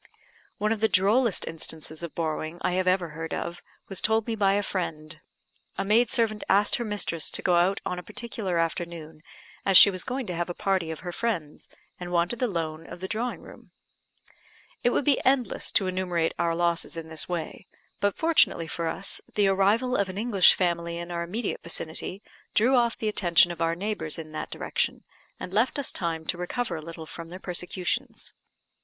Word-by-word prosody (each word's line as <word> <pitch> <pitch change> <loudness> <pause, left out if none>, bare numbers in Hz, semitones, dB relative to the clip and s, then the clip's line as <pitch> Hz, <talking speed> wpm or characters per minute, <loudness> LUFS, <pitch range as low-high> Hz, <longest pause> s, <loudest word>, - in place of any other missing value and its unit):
One 215 +1 0
of 225 - 0
the 220 - +4
drollest 210 +4 +3
instances 160 -1 -4
of 170 -2 -6
borrowing 160 0 -2
I - - +2
have 185 +1 0
ever 185 -2 +2
heard 160 +1 -5
of 170 0 -5 0.3
was 195 - -3
told 220 0 +2
me 230 - -2
by 195 -2 +3
a 205 +1 +1
friend. 155 -5 -4 0.6
A 195 - -1
maid 220 +3 +4
servant 225 -4 +1
asked 205 +1 +4
her 240 - -2
mistress 205 -7 -1
to - - -2
go 180 - +3
out 175 +3 +3
on 180 - -2
a - - -9
particular 210 -4 -3
afternoon, 165 -2 -3 0.4
as 195 -2 +7
she 200 - +10
was 185 -1 -3
going 260 0 -3
to 180 - -4
have 175 +1 -2
a 175 - -4
party 190 -4 0
of 160 - -6
her 180 - -5
friends, 175 -8 -3 0.3
and 175 -1 -6
wanted 175 +7 +1
the 250 - +2
loan 165 -4 -4
of - - -9
the 190 - -4
drawing 230 +4 -2
room. - - -14 1.1
It 245 - +3
would 255 - 0
be 285 -3 +3
endless 260 -2 +1
to 195 - +3
enumerate 180 -3 0
our 165 -1 +1
losses 170 -1 0
in 165 -1 -6
this 160 +2 -3
way; 175 +2 -4 0.3
but, 205 -1 +1
fortunately 320 - +3
for 165 0 -3
us, 195 +4 -2
the 205 -2 +4
arrival 210 +7 +2
of 200 -1 +1
an 185 - -6
English 210 -4 +5
family 170 -2 -1
in 170 +1 -6
our 170 0 -2
immediate 205 +7 -3
vicinity 170 +4 -4 0.3
drew 240 +5 +4
off 235 -1 +2
the 220 - -2
attention 175 -4 +5
of 170 -1 -7
our 165 0 +1
neighbours 180 -5 -3
in 155 -1 -8
that 155 - -5
direction, - - -2 0.4
and 180 - -7
left 225 +7 +2
us 285 - -1
time 165 -2 -3
to 175 - -2
recover 180 +2 -2
a 160 - -5
little 165 0 -8
from 165 +1 -9
their 180 - -7
persecutions. 180 0 -3
180 Hz, 200 wpm, -27 LUFS, 170-210 Hz, 1.1 s, she